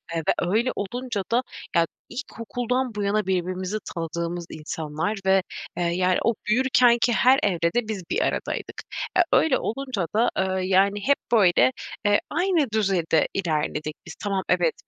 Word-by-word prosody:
Eee, -, -, +1 dB
ve -, -, +5 dB, 0.2 s
öyle 235 Hz, +5 st, +2 dB
olunca 230 Hz, 0 st, -3 dB
da 245 Hz, +2 st, +3 dB, 0.3 s
ya, 170 Hz, -1 st, +4 dB, 0.2 s
ilkokuldan 245 Hz, -1 st, -3 dB
bu 205 Hz, -, -2 dB
yana 205 Hz, +1 st, +1 dB
birbirimizi 185 Hz, +2 st, -1 dB, 0.2 s
tanıdığımız 170 Hz, +1 st, -3 dB
insanlar 155 Hz, +5 st, -3 dB
ve, 190 Hz, -1 st, +4 dB, 0.3 s
eee, 175 Hz, -, 0 dB
yani, 180 Hz, +2 st, +2 dB
o 230 Hz, -, +3 dB
büyürkenki 245 Hz, 0 st, +4 dB
her 260 Hz, +4 st, +5 dB
evrede 185 Hz, +4 st, +1 dB
biz 200 Hz, -5 st, -4 dB
bir -, -, +1 dB
aradaydık. -, -, -2 dB, 0.4 s
E, -, -, +3 dB
öyle 300 Hz, -5 st, +4 dB
olunca 240 Hz, -7 st, -3 dB
da, 230 Hz, +2 st, +4 dB
eee, 190 Hz, -1 st, 0 dB
yani, 195 Hz, +2 st, +3 dB
hep 280 Hz, -, +5 dB
böyle, 205 Hz, +2 st, +5 dB, 0.3 s
eee, 205 Hz, 0 st, +4 dB
aynı 345 Hz, -3 st, +2 dB
düzeyde 190 Hz, -7 st, +2 dB
ilerledik 155 Hz, -4 st, -2 dB
biz. -, -, -9 dB
Tamam, 195 Hz, -2 st, -1 dB
evet, 175 Hz, -3 st, +3 dB
200 Hz, 150 wpm, -24 LUFS, 175-240 Hz, 0.4 s, ve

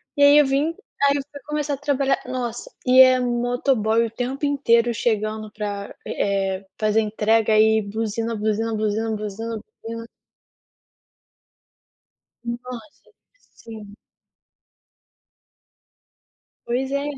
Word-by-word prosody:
E 285 Hz, -, -1 dB
aí 285 Hz, +1 st, +8 dB
eu 295 Hz, -, +6 dB
vim 285 Hz, +5 st, 0 dB, 0.3 s
aí 280 Hz, 0 st, +4 dB
eu -, -, -2 dB
fui 285 Hz, -, -10 dB
começar 300 Hz, -1 st, -2 dB
a 275 Hz, -, -2 dB
trabalhar, 275 Hz, -1 st, 0 dB
nossa, 245 Hz, -2 st, -4 dB, 0.2 s
e 255 Hz, +1 st, +7 dB
é 255 Hz, -1 st, +7 dB
motoboy 240 Hz, -2 st, +1 dB
o 225 Hz, -, -6 dB
tempo 255 Hz, +5 st, -3 dB
inteiro 240 Hz, -5 st, +2 dB
chegando 215 Hz, -1 st, -1 dB
pra, 205 Hz, -1 st, -5 dB
eh, 195 Hz, -1 st, -1 dB, 0.2 s
fazer 215 Hz, +1 st, +2 dB
entrega 220 Hz, 0 st, +2 dB
e 220 Hz, 0 st, +4 dB
buzina, 225 Hz, +2 st, -3 dB
buzina, 220 Hz, +1 st, -1 dB
buzina, 215 Hz, +1 st, -1 dB
buzina, 215 Hz, +2 st, -5 dB, 0.2 s
buzina. 230 Hz, 0 st, -6 dB, 2.4 s
Nossa, 245 Hz, +4 st, -8 dB, 0.4 s
sim. 215 Hz, -3 st, -11 dB, 2.7 s
Pois 260 Hz, +3 st, -1 dB
é. 280 Hz, 0 st, 0 dB
230 Hz, 110 wpm, -22 LUFS, 215-260 Hz, 2.7 s, aí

